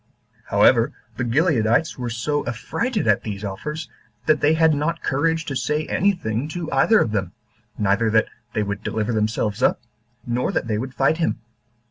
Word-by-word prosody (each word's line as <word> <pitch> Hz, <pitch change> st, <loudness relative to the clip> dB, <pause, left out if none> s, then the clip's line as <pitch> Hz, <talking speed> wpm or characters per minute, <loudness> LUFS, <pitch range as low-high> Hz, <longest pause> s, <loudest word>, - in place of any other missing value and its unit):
However, -, -, +4 dB, 0.2 s
the -, -, -1 dB
Gileadites 125 Hz, +1 st, +2 dB
were 125 Hz, -2 st, -4 dB
so 135 Hz, +6 st, -1 dB
affrighted 200 Hz, -, -2 dB
at 105 Hz, -2 st, +3 dB
these 105 Hz, -2 st, -6 dB
offers, 150 Hz, +11 st, -5 dB, 0.4 s
that 155 Hz, -2 st, +3 dB
they 155 Hz, +2 st, +4 dB
had 160 Hz, -1 st, +4 dB
not 160 Hz, +3 st, -1 dB
courage 160 Hz, +4 st, 0 dB
to 140 Hz, -, -4 dB
say 150 Hz, +3 st, -1 dB
any 200 Hz, +2 st, +2 dB
thing 115 Hz, -, -3 dB
to 165 Hz, 0 st, -5 dB
either 140 Hz, +11 st, +4 dB
of 110 Hz, -, +1 dB
them, 100 Hz, -3 st, -2 dB, 0.4 s
neither 105 Hz, +2 st, +2 dB
that 110 Hz, 0 st, +3 dB, 0.3 s
they 110 Hz, -, +1 dB
would 100 Hz, 0 st, -4 dB
deliver 110 Hz, +1 st, -2 dB
themselves 110 Hz, -1 st, -1 dB
up, -, -, +3 dB, 0.5 s
nor 120 Hz, +1 st, -1 dB
that -, -, 0 dB
they 110 Hz, -2 st, -1 dB
would 130 Hz, +2 st, -5 dB
fight 140 Hz, +4 st, +2 dB
him. 165 Hz, -8 st, 0 dB
125 Hz, 175 wpm, -22 LUFS, 110-155 Hz, 0.5 s, However